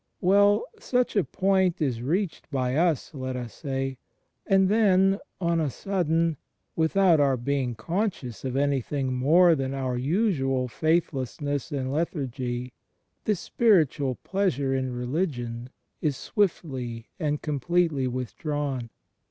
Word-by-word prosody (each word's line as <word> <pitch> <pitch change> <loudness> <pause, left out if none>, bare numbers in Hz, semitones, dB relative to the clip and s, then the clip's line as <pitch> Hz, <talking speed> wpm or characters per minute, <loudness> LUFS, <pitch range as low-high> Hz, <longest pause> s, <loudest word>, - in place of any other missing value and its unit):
Well, 200 - +4
such 250 - 0
a 200 - +4
point 190 -1 +1
is 130 -7 -1
reached 170 +7 -2
by 130 -3 -1
us, 165 -2 +1
let 130 -2 -4
us 120 -2 -5
say; 135 -3 -3 0.5
and 195 -1 +4
then, 195 -2 +4 0.2
on 170 -2 +1
a 150 - 0
sudden, 165 -2 0 0.4
without 165 +1 +4
our 135 -2 +3
being 125 -1 -1
conscious 165 - -3
of 130 -1 -3
anything 140 -1 0
more 165 +7 +5
than 135 -2 -2
our 130 -2 -2
usual 135 - +1
faithlessness 145 -1 -1
and 135 -2 -2
lethargy, 130 -6 -3 0.5
this 205 -5 0
spiritual 155 - +2
pleasure 160 -9 0
in 130 -1 -1
religion 125 -2 -3 0.3
is 145 -4 0
swiftly 130 - -2
and 150 -3 -1
completely 150 -1 +1
withdrawn. 130 0 -3
145 Hz, 120 wpm, -26 LUFS, 130-175 Hz, 0.5 s, more